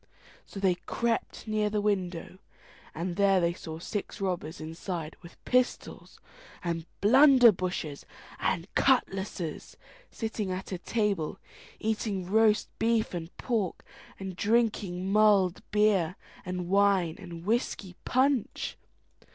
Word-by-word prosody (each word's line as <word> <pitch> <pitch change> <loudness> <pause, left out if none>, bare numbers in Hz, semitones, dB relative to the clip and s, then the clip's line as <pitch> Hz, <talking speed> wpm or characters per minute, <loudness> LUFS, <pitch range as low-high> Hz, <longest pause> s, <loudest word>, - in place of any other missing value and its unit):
So 195 - -8
they 190 -2 +3
crept 230 -1 -2
near 215 -1 +1
the 210 0 0
window, 185 -3 -2 0.6
and 170 +2 -3
there 195 -2 +4
they 170 -1 +1
saw 160 -2 -7
six 200 +4 -5
robbers 180 -4 -3
inside, 160 0 -5
with 170 -1 -14
pistols, 250 0 -1 0.4
and 170 -1 -3
blunderbushes, 210 - +5 0.3
and 170 +2 -1
cutlashes, 195 - 0 0.3
sitting 220 -3 -3
at 185 +2 -5
a 185 - -3
table, 200 -5 -1 0.4
eating 210 -3 -1
roast 215 +2 +3
beef 225 -2 +1
and 170 -2 -4
pork, 220 -8 -2 0.3
and 190 -2 -5
drinking 200 -4 0
mulled 200 -4 +4
beer, 210 -5 +2 0.3
and 180 -1 -3
wine, 195 -3 +3
and 170 -3 -9
whisky 210 -4 -1
punch. 260 -2 0
195 Hz, 115 wpm, -29 LUFS, 175-215 Hz, 0.6 s, blunderbushes